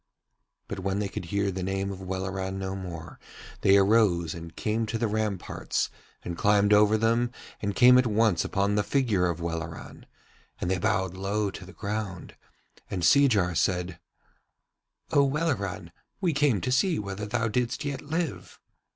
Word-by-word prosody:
But 100 - -5
when 95 +1 -1
they 105 -1 -1
could 95 - -6
hear 100 +3 0
the 95 0 -4
name 95 +1 -2
of 95 -1 -8
Welleran 95 0 -3
no 95 0 -3
more 85 -4 -8 0.4
they 100 0 +6
arose 95 -5 +3
and 85 -1 -9
came 110 +1 -1
to 110 +2 -2
the 115 0 0
ramparts 105 -3 -2 0.3
and 85 - -4
climbed 105 +2 +3
over 105 +1 +5
them 115 +2 +1 0.3
and 100 -1 -2
came 125 0 +7
at 125 - +2
once 110 -5 +2
upon 100 +1 0
the 105 - +2
figure 105 -8 +1
of 85 -1 -3
Welleran, 85 -1 -6 0.5
and 90 - -1
they 95 - 0
bowed 105 -4 0
low 100 +2 -1
to 90 - -10
the - - -11
ground, 100 -3 -5 0.5
and 90 -3 -3
Seejar 100 -3 +4
said: 90 0 0 1.1
'O 140 - +5
Welleran, 140 - -1 0.3
we 180 -5 +1
came 140 -8 +2
to 130 - -1
see 165 +7 +2
whether 100 0 -4
thou 115 +1 0
didst 120 +5 -1
yet 140 -2 -3
live.' 160 0 -4
100 Hz, 165 wpm, -27 LUFS, 95-115 Hz, 1.1 s, came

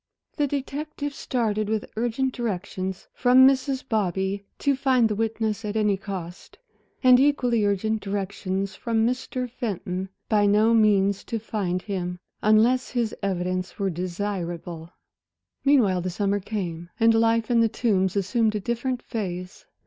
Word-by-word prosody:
The 290 - +1
detective 285 +1 -4
started, 215 -6 -1
with 220 -1 -1
urgent 240 +3 -1
directions 190 -4 -4
from 255 +1 +6
Mrs. 270 0 0
Bobby 195 -2 -1
to 280 -1 +1
find 260 -3 +3
the 215 - -1
witness 220 0 -1
at 210 0 -4
any 210 -2 +2
cost, 190 -3 -7 0.5
and 250 -1 +7
equally 250 -5 +2
urgent 210 +2 0
directions 195 -1 -3
from 225 +2 0
Mr. 250 +1 -2
Fenton 190 -5 -4 0.2
by 210 -2 +3
no 215 +3 +4
means 200 -3 +3
to 230 - -2
find 195 -5 -2
him, 180 -3 -3 0.2
unless 225 +4 +4
his 235 -3 -1
evidence 185 -1 -2
were 195 -2 0
desirable. 175 -2 -4 0.7
Meanwhile 230 -11 +4
the 185 - -2
summer 200 +2 0
came 175 -5 -5
and 225 0 +5
life 225 0 +2
in 235 - +4
The 230 -1 +4
Tombs 195 -5 +1
assumed 215 +3 +1
a - - 0
different 240 +4 -2
phase. 180 -4 -5
215 Hz, 140 wpm, -25 LUFS, 190-235 Hz, 0.7 s, and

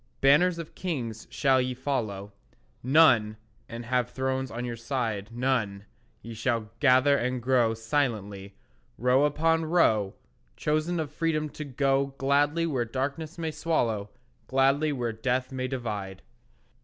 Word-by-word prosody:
Banners 165 +6 +4
of 165 -2 -7
kings 120 - -4
shall 135 -2 +2
ye 125 0 -2
follow 110 -7 -3 0.5
None, 120 -6 +4 0.3
and 115 +1 -7
have 125 0 0
thrones 130 0 -2
on 120 0 -5
your 120 -1 -4
side 115 -4 -3
None; 115 -5 -1 0.4
ye 115 +2 -8
shall 115 -1 -2
gather 140 0 +5
and 125 -1 -1
grow 120 -2 +2
Silently, 110 -5 -2 0.4
row 125 +4 +3
upon 160 +2 +1
row, 110 - +2 0.4
Chosen 155 +3 0
of 155 -3 -3
Freedom 155 -1 -1
to 150 - -7
go 135 0 0
Gladly 145 +4 +2
where 135 -7 0
darkness 140 +7 -4
may 160 -1 -2
swallow, 120 -10 -1 0.4
Gladly 135 +3 +2
where 120 -5 -2
death 125 +4 -1
may 130 -1 -3
divide. 105 - -5
130 Hz, 135 wpm, -27 LUFS, 115-145 Hz, 0.5 s, gather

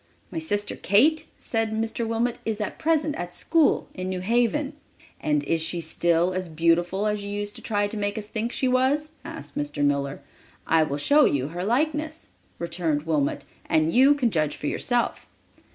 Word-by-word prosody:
"My 330 - -3
sister 205 -10 -2
Kate," 285 - +3
said 225 -1 -1
Mr. 225 +1 -2
Wilmot, 230 +1 -1
"is 220 -1 -2
at 210 - -4
present 310 -1 +1
at 175 0 -5
school 325 -3 +2
in 185 0 -4
New 185 -1 -3
Haven." 240 +8 +1 0.5
"And 150 -1 +1
is 165 +2 0
she 170 +2 -1
still 170 +2 +1
as 185 -1 -3
beautiful 170 +5 +1
as 210 -1 -1
you 200 - -5
used 205 0 -4
to - - -10
try 205 -2 0
to 215 - -6
make 205 +1 -1
us 215 - -3
think 220 +2 -3
she 260 - 0
was?" 265 +4 +2
asked 325 +1 -9
Mr. 290 - -1
Miller. 140 0 0 0.4
"I 165 0 +4
will 145 -2 0
show 290 - +5
you 140 0 +1
her 175 +3 -4
likeness," 305 - -1 0.3
returned 165 -3 -1
Wilmot, 150 -3 0 0.2
"and 160 +1 +2
you 270 +3 +6
can 250 -5 +1
judge 155 -4 0
for - - -8
yourself." 240 - -1
205 Hz, 185 wpm, -25 LUFS, 165-255 Hz, 0.5 s, you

